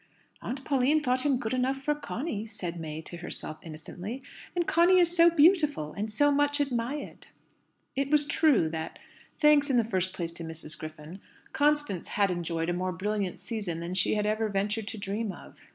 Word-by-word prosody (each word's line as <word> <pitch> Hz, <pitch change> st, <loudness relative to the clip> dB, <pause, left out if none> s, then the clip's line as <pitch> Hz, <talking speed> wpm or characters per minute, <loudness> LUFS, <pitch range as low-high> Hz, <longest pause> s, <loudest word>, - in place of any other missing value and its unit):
"Aunt 265 Hz, +2 st, -5 dB
Pauline 285 Hz, +2 st, +2 dB
thought 255 Hz, +2 st, +2 dB
him 275 Hz, -3 st, +3 dB
good 230 Hz, 0 st, -3 dB
enough 255 Hz, +1 st, +1 dB
for 295 Hz, -, +2 dB
Conny," 285 Hz, -5 st, -4 dB
said 175 Hz, -5 st, -5 dB
May 155 Hz, -1 st, -5 dB
to 175 Hz, -, -6 dB
herself 160 Hz, -2 st, -4 dB
innocently; 180 Hz, -, -7 dB, 0.3 s
"and 350 Hz, -1 st, +1 dB
Conny 345 Hz, +3 st, +5 dB
is 350 Hz, -1 st, +4 dB
so 340 Hz, 0 st, +7 dB
beautiful, 300 Hz, -, +3 dB
and 210 Hz, +2 st, -4 dB
so 290 Hz, +7 st, +3 dB
much 290 Hz, +1 st, +2 dB
admired!" 275 Hz, +1 st, -3 dB, 0.7 s
It 275 Hz, 0 st, 0 dB
was 300 Hz, 0 st, +4 dB
true 290 Hz, -, +3 dB
that 160 Hz, 0 st, -5 dB, 0.4 s
thanks, 300 Hz, -1 st, +5 dB
in 260 Hz, -, +3 dB
the 235 Hz, -, +4 dB
first 190 Hz, -4 st, -1 dB
place, 170 Hz, -3 st, -3 dB
to 170 Hz, -, -7 dB
Mrs. 160 Hz, -1 st, -3 dB
Griffin 155 Hz, +4 st, -9 dB, 0.3 s
Constance 295 Hz, -, +1 dB
had 200 Hz, -2 st, +1 dB
enjoyed 170 Hz, -1 st, -2 dB
a -, -, +1 dB
more 185 Hz, +1 st, -1 dB
brilliant 195 Hz, +1 st, -2 dB
season 200 Hz, -8 st, -4 dB
than 170 Hz, +2 st, -4 dB
she 185 Hz, +3 st, +2 dB
had 210 Hz, 0 st, 0 dB
ever 215 Hz, +1 st, 0 dB
ventured 205 Hz, +2 st, -1 dB
to 225 Hz, -, -5 dB
dream 205 Hz, +2 st, -3 dB
of. -, -, -12 dB
215 Hz, 185 wpm, -28 LUFS, 175-290 Hz, 0.7 s, so